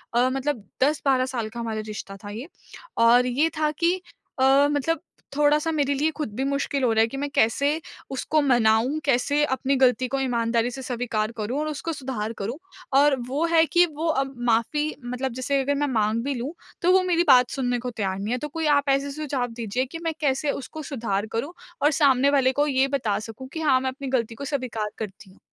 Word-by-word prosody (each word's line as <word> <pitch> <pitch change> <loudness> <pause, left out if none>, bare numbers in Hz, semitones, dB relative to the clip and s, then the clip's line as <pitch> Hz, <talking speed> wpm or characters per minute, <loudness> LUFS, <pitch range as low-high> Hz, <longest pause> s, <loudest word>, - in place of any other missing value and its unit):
अ, 250 +2 +4
मतलब 270 -4 -2 0.2
10-12 275 -3 +2
साल 235 -4 -3
का 235 +2 -8
हमारा 225 -2 -3
रिश्ता 195 -2 -7
था 205 - -7
ये। 230 +8 -7 0.5
और 235 +2 +5
ये 275 +6 +1
था 305 -1 +2
कि 340 +4 +1 0.4
अ, 270 +2 +5
मतलब 320 +3 0 0.4
थोड़ा-सा 300 +2 +3
मेरे 285 -2 +1
लिए 305 +3 +1
ख़ुद 260 -9 -4
भी 265 - -1
मुश्किल 280 -1 -1
हो 235 - +3
रहा 220 - +4
है 225 - +4
कि 270 - -7
मैं 285 +1 -2
कैसे 255 +6 +3 0.4
उसको 300 +3 0
मनाऊँ, 240 +2 +3
कैसे 285 +3 +2
अपनी 265 0 0
गलती 250 0 +3
को 275 +2 -2
ईमानदारी 235 -2 0
से 265 - -7
स्वीकार 235 -3 -2
करूँ 230 +7 -2
और 305 - -1
उसको 310 +2 -3
सुधार 245 -6 -4
करूँ। 235 +8 -3 0.4
और 290 -1 +5
वो 290 +6 0
है 325 0 +6
कि 350 +2 +4
वो 325 +2 -1 0.2
अब 270 0 -9 0.2
माफ़ी 295 +7 +1
मतलब 250 +1 -3
जैसे 270 +2 0
अगर 285 +2 0
मैं 290 +1 0
माँग 220 +1 +1
भी 280 0 -1
लूँ, 255 +6 -4 0.3
तो 355 +1 +4
वो 375 - +5
मेरी 345 -2 +2
बात 250 -2 +6
सुनने 245 -2 -1
को 250 +1 -4
तैयार 195 -3 -3
नहीं 210 +4 -3
है। - - 0
तो 300 - -4
कोई 320 +2 -3
आप 285 0 -1
ऐसे 275 +1 +1
सुझाव 275 -4 -2
दीजिए 235 +2 -2
कि 330 +5 -8
मैं 325 -1 -1
कैसे 280 +1 +1
उसको 310 +4 -7
सुधार 215 -5 -1
करूँ 280 +9 -3 0.3
और 295 +2 +4
सामने 280 -2 +4
वाले 265 -2 +3
को 290 +2 +1
ये 270 -1 +2
बता 245 -7 -1
सकूँ 225 +4 -9
कि 320 - -4
हाँ, 265 -4 +4
मैं 260 - -1
अपनी 275 +1 -7
गलती 235 -3 -1
को 280 - -7
स्वीकार 250 -7 -3
करती 205 -1 -7
हूँ। 185 - -22
265 Hz, 215 wpm, -24 LUFS, 235-290 Hz, 0.5 s, है